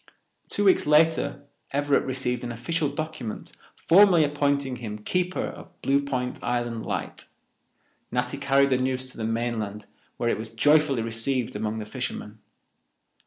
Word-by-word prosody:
Two 205 - 0
weeks 190 -5 +4
later 155 -1 +3 0.3
Everett 145 0 +2
received 125 -2 -1
an 120 - -4
official 145 +6 -1
document 145 -6 -5 0.2
formally 180 -2 +6
appointing 140 -3 0
him 110 -3 -6
keeper 180 - -1
of - - -10
Blue 140 +1 +3
Point 125 -3 -3
Island 120 -2 -2
light. - - -4 0.9
Natty 125 +3 -1
carried 140 0 +3
the 130 - +4
news 130 0 -1
to - - -15
the 115 - -4
mainland, 110 -3 -2 0.3
where 120 - 0
it - - 0
was 110 0 -5
joyfully 140 +1 +3
received 115 +2 -1
among 105 +1 -2
the 110 - -4
fishermen. 110 -2 -5
130 Hz, 145 wpm, -26 LUFS, 115-145 Hz, 0.9 s, formally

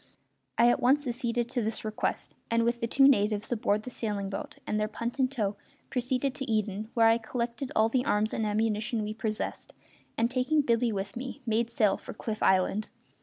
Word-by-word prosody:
I 235 - +6
at 240 - +4
once 275 +4 +3
acceded 240 -1 -1
to 250 - 0
this 220 0 -3
request, 215 0 -2 0.2
and, 230 0 +2
with 235 +1 0
the 230 - 0
two 270 +3 +5
natives 210 -5 +2
aboard 215 -2 +1
the 250 - -7
sailing 205 -4 -3
boat 195 - -5
and 215 - -1
their 215 - +1
punt 235 +4 -5
in 260 - +4
tow, 210 -7 -2 0.3
proceeded 255 +1 0
to 270 -4 -4
Eden, 215 0 -1
where 230 -1 +5
I 225 +1 +5
collected 235 +3 -3
all 220 0 +5
the 245 +2 +1
arms 215 -5 +1
and 225 - -1
ammunition 215 +1 0
we 210 +1 -3
possessed, 215 -1 -4 0.4
and, 230 +2 +2
taking 265 +4 +2
Billy 235 -3 +2
with 195 -1 -4
me, 260 +3 -6
made 230 0 +1
sail 215 -4 +2
for - - -9
Cliff 215 -1 -4
Island. 190 +3 +2
230 Hz, 200 wpm, -29 LUFS, 215-245 Hz, 0.4 s, I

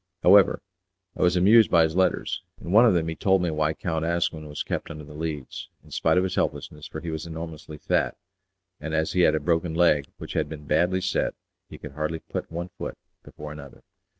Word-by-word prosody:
However, 100 +1 +6 0.5
I - - -6
was 90 0 +4
amused 105 +5 +6
by 85 -2 +5
his 80 0 -1
letters. 95 0 +1 0.2
In 85 - -7
one 115 +5 +7
of 110 - +4
them 80 -1 +1
he 80 - -2
told 95 0 +2
me 85 - 0
why 75 0 0
Count 80 -2 -2
Asquin 80 -2 -1
was 75 - -4
kept - - -4
under 75 -2 -8
the 75 +1 -12
Leads, 75 -3 -5
in - - -18
spite - - +2
of 90 - +4
his 95 - -2
helplessness, 75 0 -3
for 80 - -7
he 85 - -4
was 80 +1 -5
enormously 80 -2 -7
fat, - - 0 0.6
and 80 +1 -4
as 80 0 0
he 90 - +2
had 85 - +4
a - - +1
broken 85 -1 0
leg 75 -5 +3
which - - -8
had - - -1
been 75 -1 -8
badly 90 +5 +2
set 95 0 -1 0.3
he - - -10
could 75 - -9
hardly 75 +3 -3
put - - -6
one 85 +2 -4
foot - - -5 0.2
before 75 0 -10
another. 70 -2 -11
80 Hz, 220 wpm, -25 LUFS, 75-90 Hz, 0.6 s, one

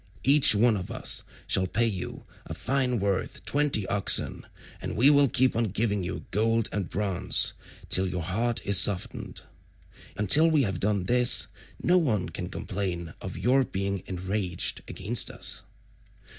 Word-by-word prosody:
Each 140 -4 +6
one 115 +2 +3
of 90 - -7
us - - 0 0.2
shall 95 0 +1
pay 115 +6 0
you 100 -6 -4 0.2
a - - -7
fine 130 -2 -1
worth 100 -2 -3
twenty 140 -8 +1
oxen, 100 0 0 0.3
and - - -5
we 135 +6 +5
will 140 -2 +4
keep 130 +2 +1
on 115 +1 +1
giving 105 -1 -1
you 90 +2 -5
gold 115 +2 0
and 100 -4 -4
bronze 100 -2 +1 0.3
till 95 +1 +3
your 90 -2 -4
heart 115 +7 -2
is 100 -2 +6
softened. 100 -3 +1 0.8
Until 145 - +5
we 155 -3 +2
have 95 -6 -3
done 100 -2 -1
this 125 +5 +2 0.4
no 180 +1 +4
one 115 - -1
can - - -7
complain 90 -4 -5
of - - -7
your 125 +8 +2
being 100 -4 -3
enraged 95 0 -3
against 110 +6 0
us." - - -3
105 Hz, 155 wpm, -26 LUFS, 95-125 Hz, 0.8 s, Each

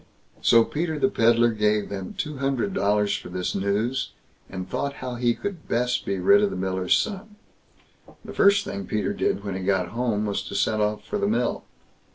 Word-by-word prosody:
So 115 -1 +6
Peter 160 +4 -2
the 200 - +2
Pedlar 115 - +3
gave 105 -1 +1
them 95 -2 -6
two 150 -7 -3
hundred 135 +7 -1
dollars 105 - +1
for - - -7
this 90 0 -3
news, 105 +7 -1 0.4
and 95 -1 -6
thought 140 +8 -2
how 130 -2 -6
he 120 -1 +1
could 195 -6 -6
best 125 +1 0
be 100 - 0
rid 200 - +5
of 205 - +2
the - - -5
miller's 95 0 +1
son. 210 0 -4 0.9
The - - -8
first 200 0 +4
thing 100 -2 -5
Peter 105 -1 -1
did 100 - -1
when 100 -2 -4
he 95 - -4
got 95 -1 0
home, 115 -3 -1
was 100 -1 -1
to - - -6
set 110 -1 +1
off 105 0 -1
for 210 - -3
the 200 - +1
mill. 225 +3 -1
115 Hz, 200 wpm, -25 LUFS, 100-145 Hz, 0.9 s, So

